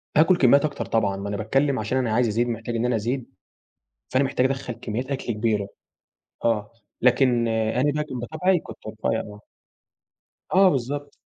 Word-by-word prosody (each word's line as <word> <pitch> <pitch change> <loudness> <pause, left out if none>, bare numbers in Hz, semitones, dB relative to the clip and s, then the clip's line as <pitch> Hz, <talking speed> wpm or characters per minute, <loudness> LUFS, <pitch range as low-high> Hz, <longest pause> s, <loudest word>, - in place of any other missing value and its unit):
آكل 170 +4 +5
كميات 140 +2 +5
أكتر 145 - -3
طبعًا، 105 -4 +1
ما 100 +1 -5
أنا 100 - -3
باتكلم 135 +5 +1
عشان 110 +5 -1
أنا 120 -4 0
عايز 120 +1 +3
أزيد 115 +3 0
محتاج 115 0 -4
إن 115 +1 0
أنا 125 -1 +1
أزيد، 120 +4 -3 0.8
فأنا 130 +2 +2
محتاج 130 -1 +1
أدخّل 135 -2 -3
كميات 120 +1 -4
أكل 130 -3 -2
كبيرة. 105 -2 0 0.8
آه، 110 -2 +1 0.3
لكن 125 -1 +3
أنا 115 +6 +1
بقى 150 0 -1
كان 130 -4 -6
بطبعي 170 +8 +1
كنت - - -11
رفيع - - -2
آه. 105 0 -9 1.1
آه، 190 0 +6
بالضبط. 140 +1 -3
125 Hz, 170 wpm, -24 LUFS, 110-140 Hz, 1.1 s, آه